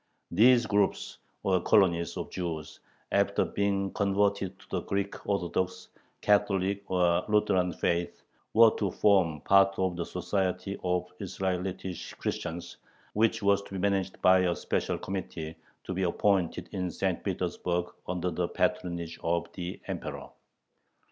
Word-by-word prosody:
These 120 +5 +6
groups, 105 -2 0 0.2
or 95 -2 +2
colonies, 85 -5 +3
of - - -5
Jews, 80 -4 -5 0.3
after - - +2
being 100 -1 -1
converted 100 -1 +1
to - - -18
the - - -1
Greek 100 0 -3
Orthodox, 95 -1 -1 0.3
Catholic, 100 -1 +1
or 90 -2 +2
Lutheran 105 -4 +2
faith, 85 0 -1 0.3
were 115 0 +8
to 100 - +1
form 90 -6 +3
part 100 0 +4
of 95 -2 0
the 85 - -2
"Society 90 +1 -2
of 90 -1 0
Israelitish 95 -1 -3
Christians," 85 +1 -4 0.4
which 115 0 +2
was 100 0 +4
to 100 - -12
be - - -3
managed 95 -1 0
by 95 0 +7
a 90 -1 +2
special - - -1
committee 80 -4 -5 0.3
to 95 - -4
be 95 - -2
appointed 95 0 +1
in 90 -1 -2
St. 95 +1 -2
Petersburg 90 -2 -1 0.2
under 90 0 -1
the 85 +1 -1
patronage 85 -2 -2
of 85 +1 -1
the 90 -1 -5
Emperor. - - -5
95 Hz, 135 wpm, -29 LUFS, 90-100 Hz, 0.4 s, were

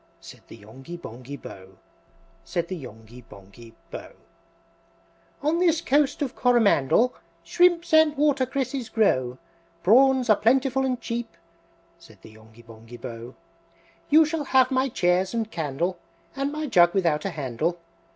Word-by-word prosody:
Said - - -14
the - - -12
Yonghy 130 +11 -11
Bonghy 130 -1 -9
Bò, 95 -6 -12 0.7
Said 170 -1 -3
the 190 - -3
Yonghy 120 -4 -12
Bonghy 110 +3 -16 0.2
Bò. - - -8
IV. - - -23 1.3
"On 310 +3 +1
this 335 -3 +2
Coast 290 0 +1
of 265 -2 -5
Coromandel 235 - +3 0.3
Shrimps 345 - +2
and 315 -2 +5
watercresses 270 -3 -1
grow, 130 - +1 0.5
Prawns 260 +4 +4
are 215 -2 +4
plentiful 265 +3 +1
and 250 -2 -2
cheap," 230 -6 -5 0.6
Said 165 -11 -18
the 110 - -13
Yonghy 110 +1 -18
Bonghy 115 +1 -13
Bò. 120 0 -9 0.7
"You 315 +2 +6
shall 305 -1 -3
have 260 -1 +3
my 260 +1 +1
chairs 180 +1 0
and 225 -1 -2
candle, 165 +4 -3 0.4
And 275 +1 -2
my 305 +1 -4
jug 175 -9 +4
without 165 -6 +1
a - - 0
handle! 155 +2 -3
190 Hz, 140 wpm, -24 LUFS, -, 1.3 s, You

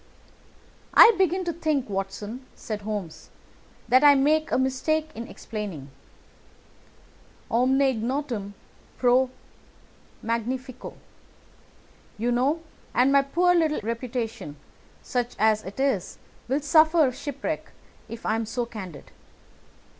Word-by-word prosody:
"I 470 -1 +10
begin 370 -1 +1
to 340 - -1
think, 310 -5 -1
Watson," 205 +5 -5
said 215 -2 -6
Holmes, 205 -6 -6 0.6
"that 255 +4 +5
I 290 -1 +8
make 305 +3 +2
a - - +2
mistake 305 +4 0
in 230 +1 -7
explaining. 190 -11 -7 1.6
'Omne 255 +3 +3
ignotum 240 -4 -2 0.4
pro 250 +1 +3 0.9
magnifico,' 250 +3 -4 1.2
you 235 +3 0
know, 270 +7 +1 0.3
and 255 +2 +4
my 280 0 +6
poor 345 +6 +2
little 320 -3 +2
reputation, 230 - -4 0.5
such 245 -1 -2
as 215 0 +3
it 195 +6 -9
is, 265 -9 0 0.3
will 270 +4 0
suffer 315 -1 +4
shipwreck 280 +2 -5 0.4
if 230 +1 -8
I - - +1
am 225 0 -2
so 240 +2 -2
candid. 190 - -9
250 Hz, 110 wpm, -25 LUFS, 220-285 Hz, 1.6 s, I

